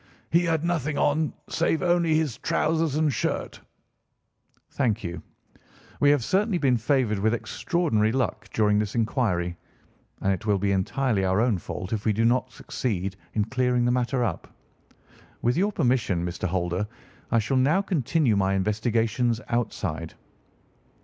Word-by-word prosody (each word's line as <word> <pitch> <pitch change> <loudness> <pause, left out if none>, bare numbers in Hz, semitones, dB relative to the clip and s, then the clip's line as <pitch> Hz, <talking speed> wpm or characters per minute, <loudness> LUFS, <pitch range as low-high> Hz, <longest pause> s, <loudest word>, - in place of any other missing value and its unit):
"He 170 - +4
had 165 -2 0
nothing 155 -4 -1
on 155 +1 +1 0.2
save 160 - 0
only 175 -2 +3
his 150 -7 0
trousers 160 -3 0
and 155 -2 +2
shirt." - - -3 1.1
"Thank 115 -6 0
you. 85 -1 -5 0.8
We 145 - +5
have 145 -4 +3
certainly 195 - +1
been 135 -6 +2
favoured 115 -3 +1
with 110 +3 +2
extraordinary 120 -7 0
luck 130 +1 -2
during 105 -1 +2
this 105 +1 -2
inquiry, 110 -7 0 0.7
and 95 - +2
it 105 +4 -6
will 105 -1 +3
be 100 +1 0
entirely 100 +3 0
our 95 +1 +2
own 115 -5 +2
fault 90 +4 -6
if 105 -2 -2
we 110 - +2
do 115 +3 +1
not 125 +2 +2
succeed 100 -6 -3 0.2
in 105 -2 +2
clearing 125 +1 +1
the 120 - +3
matter 125 +1 0
up. 120 - -3 0.9
With 120 +1 +2
your 200 +5 +2
permission, 120 - +1
Mr. 90 +1 -3
Holder, 90 +2 -1 0.4
I 115 - +2
shall 115 +4 +1
now 150 +10 +3
continue 155 - +1
my 95 0 +1
investigations 115 +4 0
outside." 90 -9 -2
120 Hz, 150 wpm, -26 LUFS, 105-145 Hz, 1.1 s, We